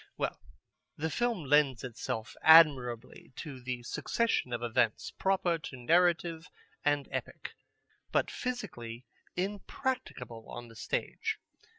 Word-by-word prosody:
Well, - - -2 0.6
the 160 +2 -1
film 235 -1 0
lends 140 -3 +4
itself 120 -2 -4
admirably 130 -8 +5
to 140 -6 -7
the 125 -1 -4
succession 225 - 0
of 120 0 -2
events 120 -2 +1
proper 185 -3 +1
to 140 -4 -8
narrative 170 +4 +2 0.3
and 145 -1 +2
epic, - - -5 0.6
but - - +2
physically 125 - -5 0.3
impracticable 190 - -3
on 120 0 -7
the 115 - -14
stage. 440 - -2
145 Hz, 110 wpm, -31 LUFS, 120-175 Hz, 0.6 s, admirably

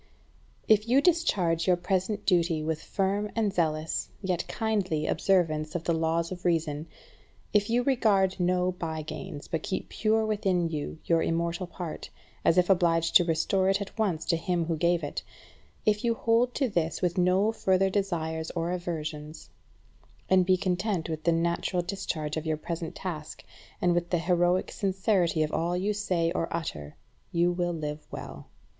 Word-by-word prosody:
12. 215 -2 +6
If 215 +2 -13
you 260 +3 +6
discharge 195 - +2
your 180 - +5
present 190 +3 -1
duty 170 -4 +2
with 160 0 -2
firm 200 +2 -1
and 215 -4 +1
zealous, 155 -3 -1
yet 180 -2 -1
kindly, 195 -9 -1
observance 155 -3 +1
of 170 - -2
the 170 - +1
laws 165 +1 0
of 180 -1 -7
reason; 160 -3 0 0.7
if 210 0 +3
you 240 +2 +2
regard 205 -8 +2
no 180 0 +2
by 160 -3 -4
gains, 145 -1 -7
but 160 - -2
keep 190 - -4
pure 220 0 +1
within 195 -5 +1
you 155 0 -4
your 165 -1 +3
immortal 170 +2 -1
part, 175 -2 -7 0.3
as 165 - +3
if 180 -1 +4
obliged 170 -3 +2
to 180 - +9
restore 175 +3 +1
it 195 +1 +2
at 200 - -6
once 185 -7 0
to 165 - +2
him 175 -1 -1
who 165 0 -1
gave 170 +1 +1
it; 145 - -3 0.6
if 210 +1 +2
you 235 -1 +2
hold 235 +2 +2
to 275 - +1
this 170 -5 -1
with 180 +1 +1
no 185 +4 +3
further 190 -3 +2
desires 160 -5 -1
or 170 +1 -1
aversions, 155 -3 -5 0.8
and 185 -1 +4
be 185 -1 +5
content 180 -2 -1
with 155 -1 -5
the 170 - +4
natural 170 +2 0
discharge 170 -5 -3
of 160 - -4
your 155 -1 0
present 165 +1 -5
task, 155 -5 -6 0.4
and 175 -1 +3
with 175 0 0
the 175 - +2
heroic 175 +1 +1
sincerity 190 -4 +1
of 155 - -2
all 175 +2 0
you 200 +3 0
say 180 -5 0
or 165 -1 -1
utter, 75 - -5 0.4
you 175 +1 +2
will 175 0 -1
live 150 -2 -5
well. - - -8
175 Hz, 175 wpm, -28 LUFS, 165-195 Hz, 0.8 s, to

